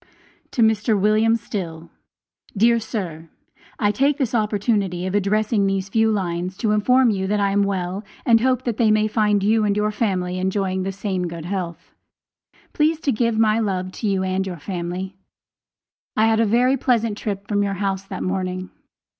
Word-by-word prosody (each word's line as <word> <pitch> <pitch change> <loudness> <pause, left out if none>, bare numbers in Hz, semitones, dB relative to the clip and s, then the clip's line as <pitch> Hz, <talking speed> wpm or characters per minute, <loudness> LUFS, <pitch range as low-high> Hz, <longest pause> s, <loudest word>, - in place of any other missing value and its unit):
To 235 - +3
MR. 220 0 +2
WM. 215 +3 +3
STILL 175 -8 -6 0.7
Dear 235 +3 +4
Sir: 170 -8 -5 0.5
I 205 -1 +2
take 275 +7 +1
this 260 -5 -1
opportunity 205 -4 0
of 185 - -3
addressing 205 +1 +1
these 195 0 -1
few 225 +2 +2
lines 180 -2 -2
to 215 0 0
inform 250 +4 +4
you 190 -2 -2
that 210 +1 0
I 200 -1 +2
am 200 +1 +2
well 195 0 -2 0.2
and 230 -2 +5
hope 255 0 +1
that 235 -4 -2
they 230 -3 +3
may 215 0 +3
find 210 -2 +1
you 215 +2 +3
and 205 -1 +1
your 210 0 +1
family 185 -4 -1
enjoying 190 0 -1
the 190 +1 -2
same 190 -2 -3
good 165 -1 -7
health. 175 -3 -5 0.8
Please 310 +1 +2
to 280 - +1
give 230 -1 0
my 220 0 +3
love 185 -4 -2
to 215 - -4
you 195 -2 +1
and 190 +1 -1
your 180 -2 -5
family. 180 +3 -5 1.0
I 215 - +4
had 225 0 +3
a 225 - +3
very 250 +5 +3
pleasant 230 -4 +1
trip 200 -2 -5
from 205 -1 +1
your 200 -1 -1
house 195 -1 -1
that - - -5
morning. 185 0 -3
205 Hz, 180 wpm, -22 LUFS, 190-220 Hz, 1.0 s, and